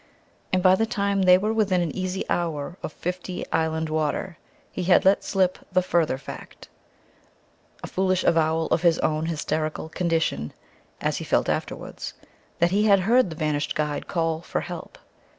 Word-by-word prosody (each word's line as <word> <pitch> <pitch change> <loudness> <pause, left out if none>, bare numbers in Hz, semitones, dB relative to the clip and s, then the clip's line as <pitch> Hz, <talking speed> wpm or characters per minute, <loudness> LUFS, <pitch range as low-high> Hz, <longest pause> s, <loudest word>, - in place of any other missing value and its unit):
And 185 -2 +1
by 185 -1 +7
the 225 +4 +2
time 200 -2 0
they 180 -1 +7
were 210 +4 -1
within 205 -5 +2
an 170 -4 -2
easy 185 0 -3
hour 165 -1 -2
of - - -5
Fifty 180 +2 -5
Island 160 0 0
Water 155 +3 -2 0.3
he 180 - -4
had 180 0 +4
let 195 +1 +4
slip 185 -2 +1
the 185 0 +3
further 165 -6 +1
fact 135 - -10 1.1
a - - -4
foolish 185 -1 0
avowal 160 0 +2
of 160 - +2
his 170 -2 +4
own 155 +1 0
hysterical 155 -1 -2
condition, 165 - -1 0.5
as - - 0
he - - -4
felt - - +1
afterwards - - -4 0.4
that 170 +1 +2
he 205 +2 +2
had 200 -3 +5
heard 235 +2 +3
the 160 - -7
vanished 150 -2 -1
guide 150 -1 -2
call 165 -2 -1
"for - - -3
help." - - -8
175 Hz, 170 wpm, -25 LUFS, 160-185 Hz, 1.1 s, by